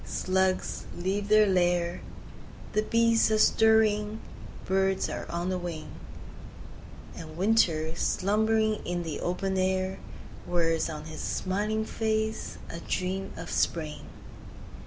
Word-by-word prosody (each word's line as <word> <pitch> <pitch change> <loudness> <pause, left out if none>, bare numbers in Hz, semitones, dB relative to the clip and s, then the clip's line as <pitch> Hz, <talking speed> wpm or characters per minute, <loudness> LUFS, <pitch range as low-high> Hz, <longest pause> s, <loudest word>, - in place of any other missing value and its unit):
Slugs 185 0 0
leave 195 +3 -1
their 215 0 +6
lair— 175 -2 +1 0.7
The 215 - +3
bees 230 +1 +3
are 215 - +2
stirring—birds 210 -3 +1
are - - -5
on 170 +2 -2
the 185 -1 -1
wing— 170 -3 -6 1.2
And 155 -1 -9
Winter, 170 -6 +2
slumbering 215 +4 +1
in 175 0 -2
the 160 -3 -4
open 190 +2 -1
air, 185 0 0 0.5
Wears 165 -2 +1
on 155 -1 -6
his 155 -1 -7
smiling 210 +3 -1
face 220 0 -2
a 170 - -7
dream 185 +2 -3
of - - -7
Spring! 155 -3 -1
190 Hz, 115 wpm, -28 LUFS, 175-215 Hz, 1.2 s, their